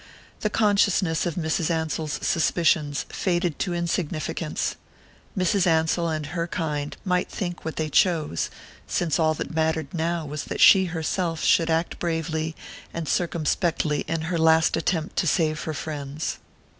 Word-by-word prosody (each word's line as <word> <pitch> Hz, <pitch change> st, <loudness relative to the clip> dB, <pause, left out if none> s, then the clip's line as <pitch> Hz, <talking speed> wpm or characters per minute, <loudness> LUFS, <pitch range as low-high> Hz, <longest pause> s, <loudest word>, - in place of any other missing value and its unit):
The 210 Hz, -, 0 dB
consciousness 200 Hz, -6 st, +2 dB
of 170 Hz, -, -3 dB
Mrs. 160 Hz, -1 st, 0 dB
Ansell's 160 Hz, -2 st, -1 dB
suspicions 155 Hz, -4 st, +2 dB
faded 175 Hz, -4 st, -1 dB
to 180 Hz, -, -1 dB
insignificance 165 Hz, -2 st, -2 dB, 0.6 s
Mrs. 185 Hz, +1 st, +2 dB
Ansell 165 Hz, +1 st, +2 dB
and 155 Hz, -2 st, -2 dB
her 165 Hz, +3 st, -3 dB
kind 150 Hz, -5 st, -3 dB
might 180 Hz, -1 st, +1 dB
think 175 Hz, -3 st, -4 dB
what 160 Hz, -, -4 dB
they 155 Hz, -, -1 dB
chose, 155 Hz, -, +1 dB, 0.4 s
since 170 Hz, -2 st, 0 dB
all 155 Hz, -1 st, +3 dB
that -, -, -5 dB
mattered 160 Hz, -2 st, 0 dB
now 170 Hz, -1 st, -1 dB
was 150 Hz, 0 st, -5 dB
that -, -, -5 dB
she 190 Hz, -2 st, +8 dB
herself 165 Hz, 0 st, -2 dB
should 165 Hz, -1 st, +4 dB
act 165 Hz, +1 st, 0 dB
bravely 160 Hz, -1 st, -2 dB, 0.4 s
and 165 Hz, -2 st, -4 dB
circumspectly 160 Hz, -2 st, 0 dB
in 165 Hz, 0 st, -1 dB
her 165 Hz, +1 st, -2 dB
last 160 Hz, 0 st, +4 dB
attempt 165 Hz, -1 st, -1 dB
to 175 Hz, -, +2 dB
save 155 Hz, -1 st, +1 dB
her 155 Hz, -, -2 dB
friends. 145 Hz, 0 st, -4 dB
160 Hz, 145 wpm, -25 LUFS, 155-175 Hz, 0.6 s, she